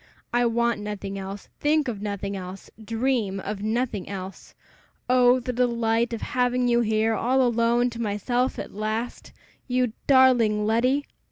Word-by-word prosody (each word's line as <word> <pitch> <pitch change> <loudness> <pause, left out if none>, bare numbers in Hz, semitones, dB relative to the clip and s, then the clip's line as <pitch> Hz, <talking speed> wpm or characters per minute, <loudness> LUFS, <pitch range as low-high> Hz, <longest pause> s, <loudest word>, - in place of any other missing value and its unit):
"I 240 0 +3
want 235 -1 +1
nothing 200 -1 -5
else, 195 +1 -7
think 300 -1 +2
of 215 -5 -4
nothing 200 -1 -3
else, 185 0 -8
dream 225 -3 -1
of 200 +1 -5
nothing 220 -2 -2
else. 190 -1 -8 0.5
Oh, 250 0 +5
the 250 0 -4
delight 235 -1 +1
of 230 - -4
having 250 0 +1
you 240 0 +3
here 220 0 +1
all 260 +4 +2
alone 240 0 +2
to 235 0 -6
myself 235 +4 -1
at - - -6
last! 215 +3 -4 0.4
You 250 -3 0
darling 245 -6 +5
Letty!" 250 +6 +2
230 Hz, 150 wpm, -25 LUFS, 210-250 Hz, 0.5 s, Oh